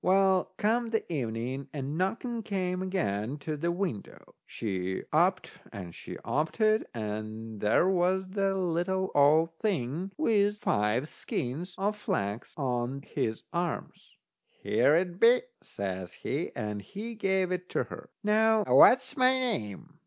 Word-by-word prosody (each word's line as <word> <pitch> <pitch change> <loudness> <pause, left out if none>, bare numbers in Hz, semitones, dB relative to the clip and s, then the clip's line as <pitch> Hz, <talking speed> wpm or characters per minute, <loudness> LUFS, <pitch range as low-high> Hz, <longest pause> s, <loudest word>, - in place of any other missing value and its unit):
Well, 190 0 +3
come 230 +2 +1
the 225 -1 0
evening 125 0 -3
a 140 - -3
knocking 190 - -2
came 185 -3 -2
again 145 - -1
to 150 +1 -4
the 170 +4 -1
window. 175 - -5
She 95 -3 -3
upped 185 +4 +2
and 90 -6 -7
she - - -8
oped 155 +8 -1
it, 215 0 +3
and 110 0 -5
there 105 - +3
was 185 0 +1
the 195 0 0
little 185 +1 0
old 155 +3 +4
thing 180 - -1
with 210 -8 +2
five 110 - +1
skeins 155 +7 -4
of 205 +2 0
flax 105 - -3
on 130 0 -2
his 110 -5 -3
arm. 175 0 -2 0.7
"Here 150 - +4
it 175 +1 0
be," 235 +2 +6 0.2
says 95 -2 -5
he, - - -3
and 105 -1 -3
he 210 - -7
gave 190 -3 0
it 180 0 -3
to - - 0
her. 245 - -10
"Now, 220 +1 +4
what's 260 +2 +6
my 255 -2 +5
name?" 165 - -3
175 Hz, 140 wpm, -29 LUFS, 120-200 Hz, 0.7 s, be